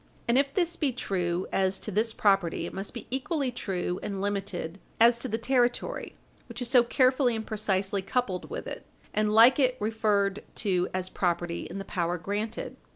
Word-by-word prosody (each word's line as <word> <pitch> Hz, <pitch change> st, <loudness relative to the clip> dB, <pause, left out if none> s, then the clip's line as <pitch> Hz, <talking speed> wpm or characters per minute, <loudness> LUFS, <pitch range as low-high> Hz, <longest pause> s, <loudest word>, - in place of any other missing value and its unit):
And 235 Hz, -, +3 dB
if 275 Hz, +1 st, +3 dB
this 345 Hz, -2 st, +1 dB
be 290 Hz, -4 st, +1 dB
true 180 Hz, -6 st, -1 dB
as 190 Hz, 0 st, +1 dB
to 215 Hz, -, -6 dB
this 220 Hz, +3 st, +1 dB
property, 195 Hz, -6 st, +2 dB
it -, -, -7 dB
must 195 Hz, +1 st, -4 dB
be 240 Hz, -, -8 dB
equally 270 Hz, 0 st, -1 dB
true 185 Hz, -6 st, -3 dB
and 200 Hz, -2 st, -4 dB
limited 195 Hz, -3 st, -3 dB, 0.2 s
as 235 Hz, +1 st, +6 dB
to -, -, -4 dB
the 225 Hz, -, -1 dB
territory, 245 Hz, -, 0 dB, 0.3 s
which -, -, -7 dB
is 245 Hz, -2 st, -3 dB
so 250 Hz, -1 st, +7 dB
carefully 255 Hz, 0 st, +3 dB
and 220 Hz, 0 st, -4 dB
precisely 200 Hz, -2 st, -1 dB
coupled 195 Hz, -3 st, -2 dB
with 475 Hz, -, -5 dB
it -, -, -6 dB, 0.3 s
and 215 Hz, 0 st, +1 dB
like 230 Hz, +6 st, +7 dB
it 255 Hz, -2 st, +3 dB
referred 210 Hz, -2 st, +1 dB
to 185 Hz, -5 st, 0 dB
as 185 Hz, 0 st, -3 dB
property 175 Hz, -2 st, -1 dB
in 180 Hz, -, -6 dB
the 195 Hz, -, -5 dB
power 175 Hz, -1 st, -1 dB
granted. 205 Hz, +6 st, -4 dB
210 Hz, 185 wpm, -28 LUFS, 190-245 Hz, 0.3 s, so